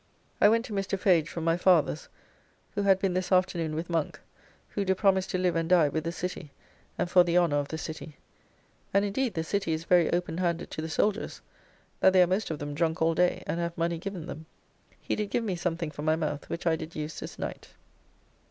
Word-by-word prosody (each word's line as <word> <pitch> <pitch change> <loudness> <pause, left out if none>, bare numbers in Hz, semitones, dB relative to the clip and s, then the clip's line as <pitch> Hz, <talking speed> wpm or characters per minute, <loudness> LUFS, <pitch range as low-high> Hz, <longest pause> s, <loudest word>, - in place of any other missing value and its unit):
I 205 - +8
went 230 +2 +2
to 215 - -7
Mr. 195 0 -1
Fage 175 -5 +3
from 170 -1 -5
my 165 +1 +2
father's, 175 -4 +2 0.6
who 205 - -1
had 195 -1 +4
been 190 -1 0
this 185 +1 -2
afternoon 175 -4 +1
with 165 +2 -3
Monk, 165 -3 -2 0.5
who 200 - -2
do 190 -1 +1
promise 190 -1 +2
to - - -1
live 180 -1 +1
and 165 0 -1
die 170 -5 +5
with 155 +2 -3
the 165 - -1
City, 175 -2 -5 0.5
and - - 0
for 180 0 +6
the 175 0 +1
honour 170 -5 +3
of 145 -1 -1
the 160 - -5
City; 155 -2 -7 0.8
and 200 +1 +4
indeed 220 +2 -1
the 160 - -1
City 190 -1 -1
is 160 +1 -3
very 175 -1 +4
open 175 -1 -1
handed 170 -2 -1
to - - -4
the 160 - -4
soldiers, 210 +6 -1 0.6
that 190 - +5
they 185 -1 +7
are - - +4
most 190 +4 -1
of 160 - -3
them 145 0 -5
drunk 160 +1 0
all 165 +1 +3
day, 180 +2 +1
and 170 - -2
have 170 0 -3
money 170 0 0
given 190 -2 -5
them. 160 -2 -8 0.5
He - - -2
did 210 -1 -2
give 240 - 0
me 200 -5 -1
something 170 -2 -2
for 145 - -8
my 155 +1 +2
mouth 150 -2 -3
which 170 - -5
I 165 -1 +3
did 160 +1 -8
use 155 0 -5
this - - -8
night. - - -6
170 Hz, 230 wpm, -28 LUFS, 160-190 Hz, 0.8 s, I